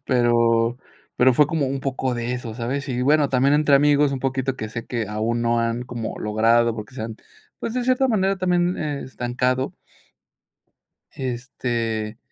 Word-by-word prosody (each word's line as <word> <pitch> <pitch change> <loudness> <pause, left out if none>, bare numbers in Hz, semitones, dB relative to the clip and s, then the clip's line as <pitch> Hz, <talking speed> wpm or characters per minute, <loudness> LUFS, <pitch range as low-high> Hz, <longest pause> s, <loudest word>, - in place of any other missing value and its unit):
pero 120 -1 +2 0.4
pero 125 0 +5
fue 150 +1 +5
como 150 -3 0
un 135 0 -2
poco 130 -2 -2
de 120 +1 -3
eso, 120 -3 -6
¿sabes?, 130 +4 -3
y, 125 -1 -1
bueno, 145 +1 +3
también 135 +2 +3
entre 150 -1 +4
amigos 145 0 +3
un 135 - -3
poquito, 130 0 -1
que 110 - -5
sé 115 +1 -6
que, 115 -4 -2
aún 115 +2 -1
no 115 0 +2
han 115 +1 -1
como 120 -2 -5
logrado, 115 +2 +2
porque 110 +2 -8
se 120 - -5
han, 110 0 -5 0.4
pues, 230 - -3
de 250 -1 -1
cierta 255 +1 +3
manera, 195 -3 +1
también, 180 -1 +1
eh, 150 -2 -3
estancado. 125 +1 -1 1.4
Este 120 -4 -3
125 Hz, 170 wpm, -23 LUFS, 115-140 Hz, 1.4 s, pero